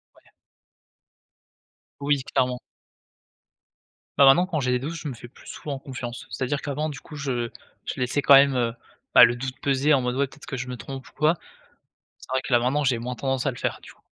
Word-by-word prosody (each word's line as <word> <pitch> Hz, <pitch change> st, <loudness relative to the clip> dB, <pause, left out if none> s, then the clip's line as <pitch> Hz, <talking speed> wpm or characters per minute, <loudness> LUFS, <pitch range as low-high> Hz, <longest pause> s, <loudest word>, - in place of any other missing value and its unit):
Ouais. -, -, -24 dB, 1.8 s
Oui 140 Hz, -2 st, +1 dB
clairement. 125 Hz, -1 st, +1 dB, 1.6 s
Bah, 140 Hz, -, +7 dB
maintenant 135 Hz, +7 st, +6 dB
quand 165 Hz, -5 st, -2 dB
j'ai 130 Hz, -, -1 dB
des 125 Hz, -, +3 dB
doutes, 145 Hz, +6 st, -4 dB
je 165 Hz, -2 st, -6 dB
me 130 Hz, -, -5 dB
fais 120 Hz, -, -11 dB
plus 120 Hz, -, -18 dB
souvent 140 Hz, -3 st, -6 dB
confiance. 125 Hz, -3 st, -7 dB
C'est-à-dire 140 Hz, +2 st, -2 dB
qu'avant 150 Hz, +2 st, -2 dB
du 145 Hz, -2 st, -7 dB
coup 150 Hz, -, -12 dB
je 125 Hz, -5 st, -2 dB, 0.4 s
je -, -, -4 dB
laissais 125 Hz, +3 st, 0 dB
quand 140 Hz, -, +8 dB
même, 140 Hz, 0 st, +6 dB
heu, 120 Hz, -2 st, 0 dB, 0.4 s
bah, -, -, +11 dB
le 120 Hz, -, 0 dB
doute 130 Hz, +1 st, -6 dB
peser 140 Hz, +2 st, +2 dB
en 135 Hz, -, +4 dB
mode: 125 Hz, 0 st, -1 dB
«Ouais, 140 Hz, +1 st, +1 dB
peut-être 145 Hz, +3 st, -15 dB
que -, -, -5 dB
je 125 Hz, +1 st, -4 dB
me 125 Hz, -, -5 dB
trompe 130 Hz, +5 st, -8 dB
ou -, -, -16 dB
quoi.» 155 Hz, +2 st, +3 dB, 0.9 s
c'est -, -, -15 dB
vrai 130 Hz, -, +1 dB
que 135 Hz, -, -7 dB
là 120 Hz, -, +6 dB
maintenant 135 Hz, +5 st, +1 dB
j'ai 130 Hz, -3 st, +2 dB
moins 125 Hz, +2 st, -4 dB
tendance 135 Hz, 0 st, -1 dB
à 135 Hz, -, +2 dB
le 120 Hz, -, -11 dB
faire, -, -, -2 dB
du -, -, -12 dB
coup. -, -, -30 dB
135 Hz, 220 wpm, -25 LUFS, 125-145 Hz, 1.8 s, bah